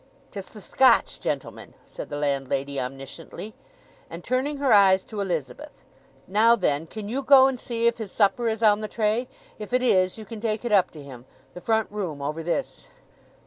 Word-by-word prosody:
"'Tis 195 -2 -7
the 210 - -13
Scotch 255 +5 +3
gentleman," - - -5
said - - -9
the 145 - -5
landlady 140 -1 -2
omnisciently; 135 +10 -7 0.6
and 170 +1 -9
turning 265 +4 -1
her 275 -3 +2
eyes 190 -2 +5
to 215 -2 -6
Elizabeth, 160 -10 -5 0.4
"Now 220 +4 +4
then, 160 -6 -1
can 210 +3 -7
you 255 +6 -2
go 265 0 +7
and 265 -2 0
see 235 -1 -3
if 235 0 +2
his 210 -4 -6
supper 230 +3 +1
is 225 +1 -3
on 210 -1 +4
the 215 - -3
tray? 220 +3 -1 0.3
If 215 +3 -8
it 250 0 +2
is 185 -6 +2
you 220 - -9
can 220 0 -9
take 220 0 -2
it 240 - -2
up 195 -3 +4
to 145 - -9
him. 130 -3 -12 0.3
The 180 - -10
front 220 +2 +1
room 185 -8 -4
over 150 +3 -4
this." 175 - -4
210 Hz, 190 wpm, -25 LUFS, 165-230 Hz, 0.6 s, go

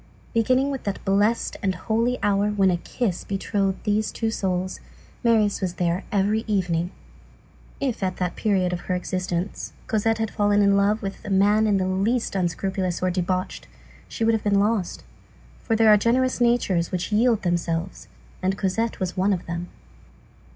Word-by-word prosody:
Beginning 255 +4 +2
with 270 - -4
that 200 -1 -4
blessed 205 +4 +1
and 190 -4 0
holy 230 +6 0
hour 205 0 +2
when 195 -2 +3
a 175 - +1
kiss 190 +1 -3
betrothed 195 0 -1
these 210 0 0
two 225 -1 -2
souls, 185 -3 -2 0.4
Marius 220 -4 +3
was 180 -2 -2
there 175 +1 0
every 210 +2 +1
evening. 180 -5 0 0.9
If, 265 -6 -2
at 185 -1 -1
that 180 -1 -2
period 185 -4 +1
of 175 - -2
her 185 - -2
existence, 180 0 -3
Cosette 220 +1 +1
had 220 -1 -2
fallen 205 -1 +2
in 200 0 +4
love 205 +2 +2
with 195 0 -5
a - - -6
man 205 +3 +3
in 205 -2 +3
the 185 - 0
least 205 +6 0
unscrupulous 185 0 -1
or 185 - +2
debauched, 185 0 -2 0.4
she - - -4
would 225 - +4
have 220 - 0
been 200 -1 +3
lost; 205 -3 0 0.6
for 225 - -1
there 225 0 +5
are - - +7
generous 250 +4 +1
natures 220 -8 +2
which 180 +3 -3
yield 220 0 +3
themselves, 175 0 -2 0.3
and 190 +1 0
Cosette 220 +4 -1
was 185 -1 -2
one 190 +2 +2
of 180 - -4
them. 170 +1 -4
200 Hz, 170 wpm, -24 LUFS, 185-220 Hz, 0.9 s, are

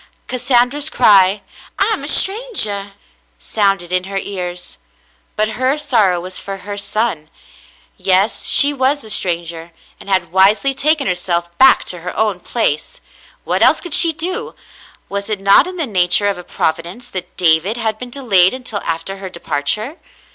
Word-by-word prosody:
Cassandra's 255 +4 +1
cry, 200 -6 +4 0.3
"I 400 +3 +2
am - - -4
a - - -5
strangah!" 295 - 0 0.4
sounded 195 - -1
in 185 0 0
her 195 0 -5
ears, 180 - -6 0.6
but 215 0 0
her 255 +6 -1
sorrow 225 -12 +2
was 185 +1 -7
for 195 0 -7
her 205 0 -5
son. 200 -6 -2 0.7
Yes, 190 +3 +1
she 285 +1 +5
was 275 +1 0
a 220 - -6
stranger, 170 -2 -2 0.3
and - - -12
had 180 -4 0
wisely 200 +9 +3
taken 300 +1 +1
herself 175 -2 -2
back 265 0 +7
to 180 - -6
her 180 +2 -7
own 210 -4 0
place; 170 -7 -2 0.4
what - - -1
else - - +5
could 350 -4 -7
she 335 +1 +6
do? 350 +4 -4 0.5
Was 200 +1 -5
it 210 -2 -2
not 195 - +4
in 370 0 -7
the 325 - -1
nature 185 -3 +1
of 200 -2 -1
a - - -9
Providence 170 +10 -3
that 185 -4 -8
David 175 +5 +2
had 220 -2 -2
been 250 - -8
delayed 230 -7 +2
until 250 -5 -5
after 165 +4 -4
her 190 -1 -7
departure 180 - -3
200 Hz, 160 wpm, -16 LUFS, 180-250 Hz, 0.7 s, back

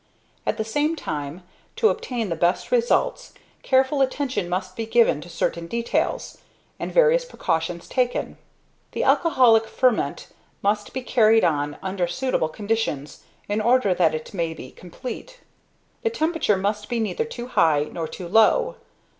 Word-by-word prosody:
At - - 0
the 220 - -1
same 295 +8 0
time, 150 - -5 0.3
to 445 - +4
obtain 235 -5 -3
the 165 - -1
best 175 +3 0
results, 245 - +1 0.3
careful 265 +1 +2
attention 260 -7 -1
must 185 +1 -3
be 225 -1 -4
given 225 -10 +3
to 175 - -11
certain 170 0 -2
details, 235 +5 -2 0.4
and - - -4
various - - +4
precautions 170 - -3
taken. 250 -2 -1 0.6
The - - -1
alcoholic 240 -9 +4
ferment 250 -1 0 0.3
must 205 +1 0
be 260 - -4
carried 225 -3 +4
on 145 -2 0
under 190 -2 -1
suitable 215 -5 -1
conditions, 205 -7 -3 0.3
in 205 +1 0
order 235 -3 +3
that 170 -3 +2
it 155 +5 -7
may 165 -3 -2
be 130 - -10
complete. 255 - -9 0.6
The 455 - +1
temperature 320 - +1
must 205 +2 -2
be 240 -1 -1
neither 225 - -1
too 245 - -7
high, 155 -9 +3
nor 165 -2 -4
too 180 +1 -8
low. 345 - +3
220 Hz, 150 wpm, -23 LUFS, 175-260 Hz, 0.6 s, to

